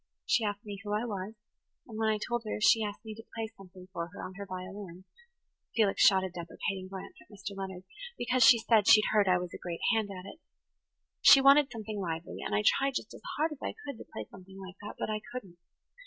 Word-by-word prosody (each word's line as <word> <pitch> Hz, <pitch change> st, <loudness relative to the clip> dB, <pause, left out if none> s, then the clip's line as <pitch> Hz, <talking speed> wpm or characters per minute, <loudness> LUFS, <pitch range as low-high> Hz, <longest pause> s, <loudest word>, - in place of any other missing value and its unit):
She 235 Hz, -, +2 dB
asked 205 Hz, 0 st, -3 dB
me 200 Hz, -1 st, -7 dB
who 205 Hz, -1 st, -3 dB
I 215 Hz, +3 st, 0 dB
was, 205 Hz, -1 st, -5 dB, 0.5 s
and 220 Hz, -2 st, -8 dB
when 220 Hz, -1 st, +2 dB
I 215 Hz, -, +2 dB
told 240 Hz, +2 st, -2 dB
her 215 Hz, -, -4 dB
she 220 Hz, +1 st, +5 dB
asked 210 Hz, +2 st, -5 dB
me 220 Hz, -, -6 dB
to 225 Hz, +1 st, -11 dB
play 225 Hz, 0 st, -4 dB
something 185 Hz, -1 st, -14 dB
for 170 Hz, -2 st, -3 dB
her 180 Hz, +3 st, -10 dB
on 185 Hz, -, -8 dB
her 200 Hz, +1 st, -8 dB
violin,"–Felix 195 Hz, -, -5 dB
shot 190 Hz, -2 st, +6 dB
a 190 Hz, -, -2 dB
deprecating 185 Hz, +2 st, -5 dB
glance 190 Hz, 0 st, -8 dB
at -, -, -20 dB
Mr. 200 Hz, 0 st, -7 dB
Leonard–"because, 200 Hz, -, -2 dB
she 235 Hz, -, +9 dB
said, 225 Hz, -2 st, +3 dB
she'd 215 Hz, -1 st, +8 dB
heard 210 Hz, -2 st, +3 dB
I 180 Hz, -1 st, +5 dB
was 180 Hz, -1 st, -5 dB
a -, -, -7 dB
great 170 Hz, -2 st, -6 dB
hand 220 Hz, -2 st, 0 dB
at 185 Hz, -1 st, -8 dB
it. 250 Hz, +11 st, -10 dB, 0.8 s
She 275 Hz, -, +9 dB
wanted 275 Hz, +1 st, +6 dB
something 215 Hz, -2 st, -5 dB
lively, 165 Hz, -3 st, -4 dB
and -, -, -2 dB
I 105 Hz, -, +1 dB
tried 275 Hz, -1 st, +3 dB
just -, -, -4 dB
as -, -, -12 dB, 0.2 s
hard 315 Hz, +2 st, +1 dB
as 300 Hz, -, -9 dB
I -, -, -4 dB
could 280 Hz, -5 st, -6 dB
to -, -, -12 dB
play 110 Hz, -, -6 dB
something 190 Hz, 0 st, -13 dB
like 190 Hz, 0 st, -10 dB
that. 210 Hz, -, -7 dB
But -, -, -2 dB
I 215 Hz, 0 st, -2 dB
couldn't. 195 Hz, -9 st, -8 dB
205 Hz, 230 wpm, -30 LUFS, 185-225 Hz, 0.8 s, she